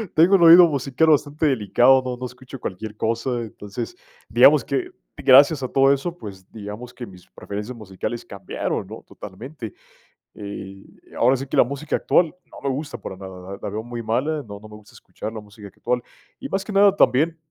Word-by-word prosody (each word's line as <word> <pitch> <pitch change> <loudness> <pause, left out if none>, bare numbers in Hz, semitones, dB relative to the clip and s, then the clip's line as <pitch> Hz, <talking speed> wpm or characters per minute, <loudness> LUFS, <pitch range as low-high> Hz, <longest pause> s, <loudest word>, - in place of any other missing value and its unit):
tengo 175 +5 +6
el 180 - +3
oído 170 +1 +9
musical 140 +1 0
bastante 150 +1 +2
delicado, 130 0 +4
no 125 -1 -3
no 125 - -5
escucho 130 +2 -10
cualquier 105 +1 -6
cosa, 115 +2 -1
entonces 105 - -7 0.3
digamos - - +6
que 365 -1 -2 0.3
gracias 140 +2 +6
a - - -1
todo 135 0 +4
eso, 165 +6 -4
pues 95 - -11
digamos 110 +3 -8
que 125 -1 -8
mis 90 -2 -15
preferencias 105 +5 -7
musicales 105 +3 -6
cambiaron, 100 - -4
¿no?, - - -10
totalmente. 110 +4 -9 0.6
Eh, 95 -1 -8 0.3
ahora 130 +3 +4
sí 135 - -6
que - - -3
la - - +6
música 140 +3 -3
actual 170 -3 +2 0.2
no - - -12
me - - -1
gusta 140 +3 -4
para 95 -3 -8
nada, 95 0 -10
la - - -10
la - - -5
veo 105 +2 -4
muy 120 0 -6
mala, 140 +8 -1
no 100 -1 -9
no 110 - -13
me 105 - -12
gusta 105 -1 -18
escuchar 110 - -8
la 110 - -6
música 105 0 -14
actual, 120 +5 -2 0.4
y 275 - -7
más 195 -4 -2
que 210 - -7
nada 200 0 +5
también, 160 +2 +3
125 Hz, 195 wpm, -22 LUFS, 105-145 Hz, 0.6 s, oído